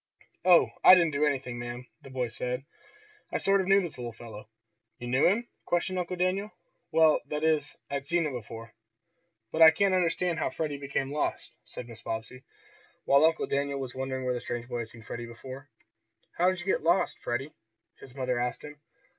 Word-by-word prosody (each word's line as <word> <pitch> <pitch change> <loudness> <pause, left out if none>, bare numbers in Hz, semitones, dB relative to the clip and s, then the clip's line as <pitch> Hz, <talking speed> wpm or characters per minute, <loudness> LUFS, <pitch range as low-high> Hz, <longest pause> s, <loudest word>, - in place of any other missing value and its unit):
"Oh, 180 -2 +6
I - - +11
didn't 170 -3 +3
do 150 +1 +2
anything, 130 -4 -2
ma'am," 120 +1 -6 0.2
the 135 - -12
boy 130 -2 -2
said. 125 +3 -4 0.7
"I - - 0
sort 195 0 +3
of 185 - -4
knew 195 +1 +5
this 170 -8 -6
little 120 -1 -4
fellow." 110 -1 -11 0.5
"You 120 - -8
knew 130 +3 +3
him?" 225 +6 +1 0.2
questioned 180 +2 0
Uncle 180 +1 -3
Daniel. 185 +3 0 0.4
"Well, 160 -1 +5
that 150 +1 -3
is 155 -2 +1
I'd 140 0 -4
seen 170 +1 +2
him 150 - -3
before." 115 -1 -8 0.8
"But 160 - -1
I 160 - +12
can't 190 +4 +2
understand 175 -1 +1
how - - 0
Freddie 150 -3 -3
became 140 -1 -2
lost," 150 - -2
said - - -8
Mrs. 115 -1 -12
Bobbsey, 115 +3 -5 0.6
while 140 +2 +5
Uncle 160 0 +3
Daniel 140 0 -1
was 130 -2 -5
wondering 130 0 -3
where 125 - +1
the 120 - -4
strange 120 0 -5
boy 120 -1 -3
had 115 -1 -5
seen 115 -1 -13
Freddie 120 +2 -6
before. 130 +4 -10 0.6
"How 180 +2 +2
did 185 -1 -2
you - - -9
get 190 - +1
lost, 170 +4 +2
Freddie?" 130 +5 -3 0.5
his 130 -1 -13
mother 125 -2 -1
asked 125 0 -2
him. 150 0 -11
140 Hz, 195 wpm, -29 LUFS, 125-165 Hz, 0.8 s, I